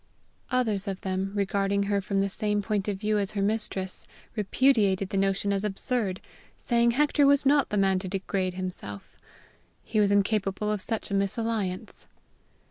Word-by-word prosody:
Others 220 -6 0
of 195 -1 -4
them, 190 0 -2
regarding 200 0 +1
her 200 0 0
from 195 0 0
the 200 - 0
same 210 0 -1
point 205 -1 -1
of 205 -2 -1
view 210 +1 0
as 200 +1 +1
her 200 - -1
mistress, 200 -3 -2 0.3
repudiated 205 -3 +2
the 195 - -2
notion 195 +1 +1
as 195 0 +1
absurd, 210 -1 -2 0.4
saying 235 -1 +2
Hector 295 -1 +4
was 280 0 +4
not 280 0 +4
the 210 - -1
man 195 -1 +3
to 190 - -6
degrade 190 -1 -2
himself! 180 - -6 0.6
He 215 - -1
was 205 -1 +4
incapable 205 0 +1
of 210 -2 -1
such 225 -1 -3
a - - -1
misalliance. 200 -1 -2
200 Hz, 165 wpm, -27 LUFS, 195-215 Hz, 0.6 s, Hector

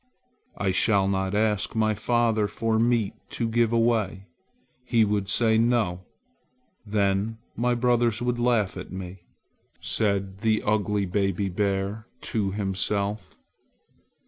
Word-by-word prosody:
"I 100 -2 0
shall 95 +1 +3
not 95 0 -1
ask 105 -2 0
my 110 -1 +2
father 110 0 +1
for 110 +1 -1
meat 115 -3 +2 0.2
to 115 - 0
give 115 0 +2
away. 115 -4 +1 0.6
He 115 -3 +3
would 100 -1 -1
say 110 0 +3
'No!' 115 -7 +1 0.8
Then 100 +1 0 0.2
my 120 +1 +1
brothers 120 -2 +2
would 120 0 -1
laugh 120 -5 +1
at - - -8
me," 95 -1 -8 0.5
said 100 -2 -1
the 110 0 +1
ugly 105 -1 +1
baby 95 +1 0
bear 100 +3 -2 0.3
to 105 -3 +1
himself. 100 +1 -2
105 Hz, 120 wpm, -25 LUFS, 100-115 Hz, 0.8 s, shall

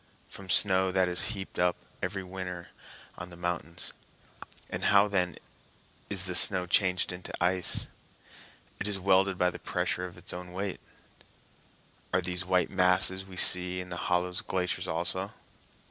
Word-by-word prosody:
"From 95 -1 -12
snow 95 -1 +3
that 95 0 +2
is 90 +2 +3
heaped 95 - -8
up 90 0 +2 0.3
every 95 -1 -3
winter 90 -2 -7 0.5
on 90 -1 -8
the 85 - -12
mountains." 85 -2 -4 0.7
"And - - -4
how, 100 0 +5
then, 90 -4 -1 0.7
is - - -1
the - - -2
snow 90 - +4
changed 90 +1 +2
into 90 0 -8
ice?" 90 0 +5 0.9
"It - - -3
is 100 -1 -2
welded 95 0 +2
by 90 0 +1
the - - -10
pressure 90 0 -2
of 90 - -14
its - - -4
own 90 0 -8
weight." 95 0 -4 1.3
"Are 90 - +1
these 90 +1 -3
white 90 0 0
masses 95 0 +3
we 95 -1 -12
see 90 0 +5
in 90 0 -7
the 90 - -5
hollows 90 0 0
glaciers 90 -1 -3
also?" 90 +4 -2
90 Hz, 155 wpm, -29 LUFS, 90-95 Hz, 1.3 s, how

